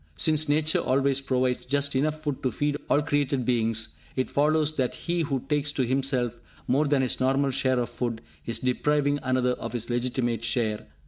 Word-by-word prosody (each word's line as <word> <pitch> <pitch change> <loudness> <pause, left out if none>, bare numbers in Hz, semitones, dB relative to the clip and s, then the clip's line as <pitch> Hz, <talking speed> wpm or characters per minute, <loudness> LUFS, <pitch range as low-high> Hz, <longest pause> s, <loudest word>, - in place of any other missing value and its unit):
Since 155 - +2
Nature 155 +1 +3
always 135 +1 +1
provides 130 -2 0
just 140 +1 0
enough 155 +3 0
food 145 -4 -3
to 130 - 0
feed 145 0 -1
all 145 - +3
created 140 -3 0
beings, 115 -2 +1 0.3
it 130 - -1
follows 155 +1 +2
that 130 -3 0
he 175 0 -2
who 140 -4 -1
takes 145 0 0
to 130 - 0
himself 125 -2 0 0.3
more 140 +4 +2
than 140 -2 +2
his 125 - 0
normal 135 +1 +2
share 130 0 +1
of 120 -1 -1
food, 115 -2 -3 0.3
is 115 - 0
depriving 145 +3 +1
another 130 -1 +1
of 115 -1 -6
his 120 0 -3
legitimate 120 -1 -1
share. 110 -2 0
130 Hz, 185 wpm, -26 LUFS, 125-145 Hz, 0.3 s, Nature